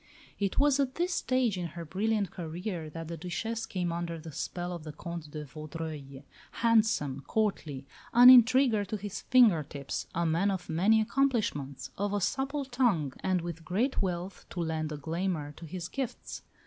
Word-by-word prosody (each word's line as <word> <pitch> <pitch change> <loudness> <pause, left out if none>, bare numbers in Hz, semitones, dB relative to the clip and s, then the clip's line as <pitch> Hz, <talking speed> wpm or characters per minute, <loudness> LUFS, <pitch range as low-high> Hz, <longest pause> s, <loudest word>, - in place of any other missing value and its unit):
It 200 -2 -1
was 285 -1 +4
at 265 -2 0
this 350 +1 0
stage 255 - +1
in 175 - -2
her 170 - -5
brilliant 205 +2 0
career 170 0 -5
that 165 +1 -7
the 170 0 -5
Duchesse 220 +7 -3
came 180 -3 -2
under 170 0 -3
the 160 0 -9
spell 175 +5 -4
of 170 -3 -7
the 155 - -6
Comte 170 -1 -7
de 150 0 -6
Vaudreuil 150 -1 -7 0.3
handsome, 215 - +2
courtly, 160 -11 -1 0.3
an 245 +2 +10
intriguer 250 -2 +6
to 205 +2 -4
his 205 -1 -6
finger 235 -10 +5
tips, 140 -1 -5
a 170 +1 +1
man 170 +5 +2
of 190 -2 -3
many 205 +7 +4
accomplishments, 215 - 0
of 205 0 0
a 205 - +1
supple 275 +8 -1
tongue, 235 - +1
and 185 -2 0
with 165 -1 -6
great 220 - 0
wealth 180 0 -3
to 175 - -6
lend 160 -2 -2
a 150 - -4
glamour 165 0 -2
to 165 - -10
his 175 +1 -5
gifts. 265 +4 -5
180 Hz, 175 wpm, -30 LUFS, 160-225 Hz, 0.3 s, an